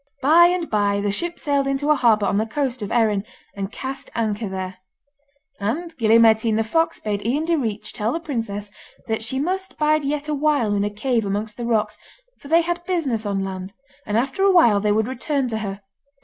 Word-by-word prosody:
By 330 Hz, +5 st, +7 dB
and 355 Hz, -2 st, -1 dB
by 205 Hz, -1 st, +1 dB
the 200 Hz, 0 st, 0 dB
ship 345 Hz, +11 st, -3 dB
sailed 280 Hz, -3 st, 0 dB
into 275 Hz, +2 st, +1 dB
a -, -, +5 dB
harbour 225 Hz, -6 st, +3 dB
on 200 Hz, +1 st, +1 dB
the 220 Hz, -, -1 dB
coast 255 Hz, -1 st, -2 dB
of 205 Hz, -, -4 dB
Erin, 215 Hz, -4 st, +2 dB, 0.3 s
and 195 Hz, 0 st, -4 dB
cast 265 Hz, +3 st, -6 dB
anchor 215 Hz, -2 st, -1 dB
there. 185 Hz, -1 st, -5 dB, 0.8 s
And 310 Hz, +12 st, -3 dB
Gille 225 Hz, -2 st, +4 dB
Mairtean 225 Hz, -1 st, +4 dB
the 225 Hz, -, +2 dB
fox 325 Hz, +9 st, 0 dB
bade 205 Hz, -1 st, -3 dB
Ian 275 Hz, +8 st, 0 dB
Direach 255 Hz, -11 st, -1 dB
tell 220 Hz, 0 st, -2 dB
the 330 Hz, -, -2 dB
princess 225 Hz, -9 st, -4 dB, 0.4 s
that 220 Hz, 0 st, -1 dB
she 225 Hz, +4 st, -2 dB
must 375 Hz, +6 st, -2 dB
bide 305 Hz, 0 st, +2 dB
yet 290 Hz, +1 st, -2 dB
a 305 Hz, -, -1 dB
while 285 Hz, -7 st, +1 dB
in 200 Hz, 0 st, +1 dB
a 205 Hz, -, 0 dB
cave 225 Hz, +3 st, -1 dB
amongst 205 Hz, +2 st, -3 dB
the 240 Hz, -, -5 dB
rocks, 215 Hz, -2 st, 0 dB, 0.4 s
for -, -, -12 dB
they 330 Hz, +3 st, +5 dB
had 345 Hz, +1 st, -3 dB
business 275 Hz, -, -1 dB
on 195 Hz, -1 st, -1 dB
land, 190 Hz, +1 st, -6 dB, 0.3 s
and 210 Hz, 0 st, 0 dB
after 265 Hz, +9 st, -1 dB
a 395 Hz, 0 st, +5 dB
while 240 Hz, -, +5 dB
they 210 Hz, +1 st, +1 dB
would 215 Hz, +1 st, +1 dB
return 265 Hz, +1 st, -1 dB
to 220 Hz, -1 st, -2 dB
her. 200 Hz, -1 st, -5 dB
230 Hz, 210 wpm, -22 LUFS, 210-295 Hz, 0.8 s, By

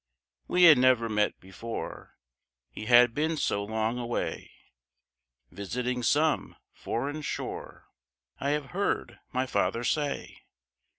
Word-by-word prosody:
We 180 Hz, -, +3 dB
had 160 Hz, -6 st, +9 dB
never 125 Hz, -2 st, +4 dB
met 105 Hz, -1 st, 0 dB
before, 110 Hz, +5 st, -8 dB, 0.5 s
He 110 Hz, -, -8 dB
had 120 Hz, -1 st, +6 dB
been 155 Hz, +4 st, 0 dB
so 100 Hz, -7 st, 0 dB
long 110 Hz, +3 st, -2 dB
away, 120 Hz, 0 st, -3 dB, 1.0 s
Visiting 125 Hz, +6 st, -3 dB
some 150 Hz, +5 st, +1 dB, 0.2 s
foreign 145 Hz, +6 st, -3 dB
shore, 150 Hz, -, -6 dB, 0.5 s
I 140 Hz, -, -1 dB
have 145 Hz, -1 st, -2 dB
heard 200 Hz, +3 st, -2 dB
my 130 Hz, 0 st, 0 dB
father 100 Hz, 0 st, 0 dB
say. 145 Hz, +3 st, -2 dB
125 Hz, 115 wpm, -28 LUFS, 110-145 Hz, 1.0 s, had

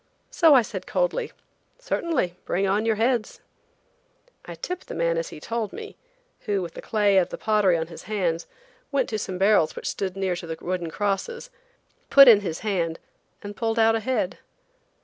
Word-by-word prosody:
So 320 Hz, -4 st, +6 dB
I 250 Hz, -, +6 dB
said -, -, -7 dB
coldly: -, -, -1 dB, 0.5 s
"Certainly; 335 Hz, -, -1 dB
bring 195 Hz, +2 st, 0 dB
on 205 Hz, +4 st, +1 dB
your 220 Hz, -, +2 dB
heads!" 230 Hz, 0 st, 0 dB, 1.1 s
I -, -, -8 dB
tipped 360 Hz, 0 st, -6 dB
a -, -, -5 dB
man, 170 Hz, 0 st, +1 dB
as 165 Hz, 0 st, -2 dB
he -, -, -10 dB
told 225 Hz, +5 st, -3 dB
me, 435 Hz, -1 st, -9 dB, 0.5 s
who, 200 Hz, -3 st, 0 dB
with 170 Hz, -1 st, -7 dB
the -, -, -8 dB
clay 205 Hz, -3 st, +3 dB
of 180 Hz, -, 0 dB
the -, -, -6 dB
pottery 210 Hz, -5 st, +2 dB
on 160 Hz, -, -2 dB
his 165 Hz, -, -12 dB
hands, 175 Hz, -6 st, -1 dB, 0.4 s
went 275 Hz, -3 st, 0 dB
to 215 Hz, -, -2 dB
some 185 Hz, -2 st, -4 dB
barrels 195 Hz, -4 st, +3 dB
which -, -, -8 dB
stood 190 Hz, -1 st, -3 dB
near 190 Hz, -2 st, 0 dB
to 170 Hz, -, -8 dB
the 160 Hz, 0 st, -5 dB
wooden 175 Hz, -2 st, -3 dB
crosses, 205 Hz, -, -3 dB, 0.6 s
put 275 Hz, -1 st, +9 dB
in 225 Hz, -4 st, +9 dB
his 175 Hz, -6 st, -5 dB
hand 175 Hz, -6 st, -1 dB, 0.5 s
and 205 Hz, 0 st, -7 dB
pulled 225 Hz, 0 st, -1 dB
out 225 Hz, 0 st, +5 dB
a 225 Hz, -, +1 dB
head! 220 Hz, -4 st, -2 dB
205 Hz, 190 wpm, -24 LUFS, 180-235 Hz, 1.1 s, put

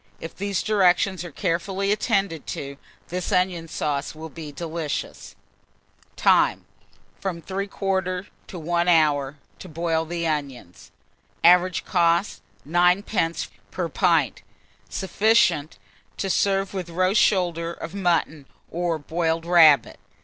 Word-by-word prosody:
If 165 Hz, -, -8 dB
these 200 Hz, -2 st, -2 dB
directions 190 Hz, -3 st, +2 dB
are 175 Hz, -, -7 dB
carefully 190 Hz, +4 st, -1 dB
attended 195 Hz, -6 st, 0 dB
to, 140 Hz, 0 st, -7 dB, 0.3 s
this 180 Hz, +3 st, -3 dB
onion 180 Hz, -3 st, 0 dB
sauce 150 Hz, -2 st, -3 dB
will 160 Hz, +1 st, -8 dB
be 155 Hz, -1 st, -9 dB
delicious. 160 Hz, 0 st, -5 dB, 0.8 s
Time. -, -, +3 dB, 0.5 s
From 185 Hz, -3 st, -4 dB
3/4 190 Hz, 0 st, -2 dB, 0.2 s
to 185 Hz, -, -8 dB
1 170 Hz, +1 st, -1 dB
hour, 150 Hz, -4 st, +2 dB, 0.2 s
to 185 Hz, -, -10 dB
boil 165 Hz, 0 st, -1 dB
the 170 Hz, +1 st, -3 dB
onions. 140 Hz, -, -4 dB, 0.5 s
Average 180 Hz, +1 st, +4 dB
cost, 170 Hz, +1 st, +1 dB, 0.3 s
9d. 175 Hz, +1 st, +1 dB, 0.2 s
per -, -, -3 dB
pint. -, -, +1 dB, 0.5 s
Sufficient 195 Hz, -5 st, +1 dB, 0.4 s
to 195 Hz, -, -1 dB
serve 195 Hz, 0 st, +1 dB
with 185 Hz, -3 st, -4 dB
a -, -, -11 dB
roast 185 Hz, +4 st, +3 dB
shoulder 170 Hz, -4 st, +1 dB
of 170 Hz, 0 st, -8 dB
mutton, 165 Hz, -6 st, 0 dB, 0.2 s
or 170 Hz, -1 st, -1 dB
boiled 165 Hz, +2 st, -2 dB
rabbit. 165 Hz, -4 st, +5 dB
175 Hz, 120 wpm, -24 LUFS, 160-190 Hz, 0.8 s, rabbit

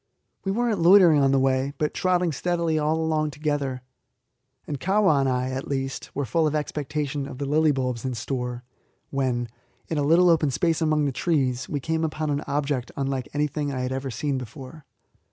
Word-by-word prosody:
We 195 Hz, -, -1 dB
were 240 Hz, +4 st, 0 dB
not 215 Hz, -5 st, 0 dB
loitering 170 Hz, -3 st, +7 dB
on 135 Hz, -, +4 dB
the 135 Hz, -, +3 dB
way, 135 Hz, +1 st, +1 dB
but 150 Hz, -, -1 dB
trotting 180 Hz, -2 st, +1 dB
steadily 170 Hz, +2 st, -1 dB
along 160 Hz, +1 st, 0 dB
all 155 Hz, -1 st, +1 dB
together, 145 Hz, -4 st, -2 dB, 0.8 s
and 145 Hz, -2 st, -4 dB
Kahwa 190 Hz, -4 st, +3 dB
and 135 Hz, -1 st, +2 dB
I, 125 Hz, 0 st, -1 dB
at 130 Hz, +1 st, -4 dB
least, 135 Hz, -1 st, -3 dB
were 140 Hz, -, -1 dB
full 155 Hz, +7 st, +1 dB
of 155 Hz, -, -1 dB
expectation 150 Hz, -1 st, -2 dB
of 130 Hz, -, -8 dB
the 140 Hz, -, -3 dB
lily 155 Hz, +2 st, +3 dB
bulbs 125 Hz, -4 st, -2 dB
in 130 Hz, -2 st, -2 dB
store, 125 Hz, 0 st, -4 dB, 0.5 s
when, 125 Hz, -3 st, 0 dB, 0.4 s
in 160 Hz, -, -1 dB
a -, -, +1 dB
little 170 Hz, +4 st, +5 dB
open 155 Hz, -3 st, +3 dB
space 160 Hz, +5 st, 0 dB
among 155 Hz, -2 st, +2 dB
the 140 Hz, -, 0 dB
trees, 130 Hz, -4 st, 0 dB
we 145 Hz, -, -1 dB
came 160 Hz, +4 st, -1 dB
upon 155 Hz, -1 st, -2 dB
an 145 Hz, 0 st, -1 dB
object 140 Hz, -3 st, -1 dB
unlike 135 Hz, -2 st, -2 dB
anything 150 Hz, 0 st, -1 dB
I 130 Hz, -2 st, -3 dB
had 125 Hz, 0 st, -2 dB
ever 135 Hz, +1 st, -3 dB
seen 135 Hz, +3 st, -2 dB
before. 135 Hz, +4 st, -10 dB
145 Hz, 195 wpm, -25 LUFS, 130-160 Hz, 0.8 s, loitering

